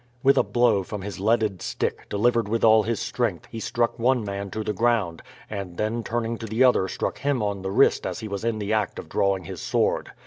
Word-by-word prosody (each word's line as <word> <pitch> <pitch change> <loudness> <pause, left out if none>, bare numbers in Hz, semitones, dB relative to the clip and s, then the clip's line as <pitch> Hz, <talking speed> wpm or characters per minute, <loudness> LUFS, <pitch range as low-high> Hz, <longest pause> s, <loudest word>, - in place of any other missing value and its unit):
With 135 +1 +6
a - - +5
blow 120 -5 +2
from 95 +1 -6
his 100 -1 -6
leaded 105 -3 +1
stick, - - -3
delivered 115 +1 +1
with 115 +1 0
all 110 0 +7
his 115 +1 -2
strength, 115 -5 -2
he 115 - -5
struck 120 +1 -1
one 125 0 +2
man 100 0 -4
to 110 +3 -4
the 105 - -2
ground, 110 -6 +1 0.3
and 100 -4 -6
then 115 +2 -1
turning 115 0 -2
to 115 - -6
the 110 +4 +2
other 125 -7 +4
struck - - -3
him 140 -5 0
on 100 -2 -2
the 95 - -3
wrist 95 - +3
as - - -4
he 110 - -6
was 100 -1 -4
in 115 -1 0
the 105 0 -2
act 105 -2 0
of - - -7
drawing 100 -2 +1
his - - -7
sword. - - 0
110 Hz, 235 wpm, -25 LUFS, 100-115 Hz, 0.3 s, all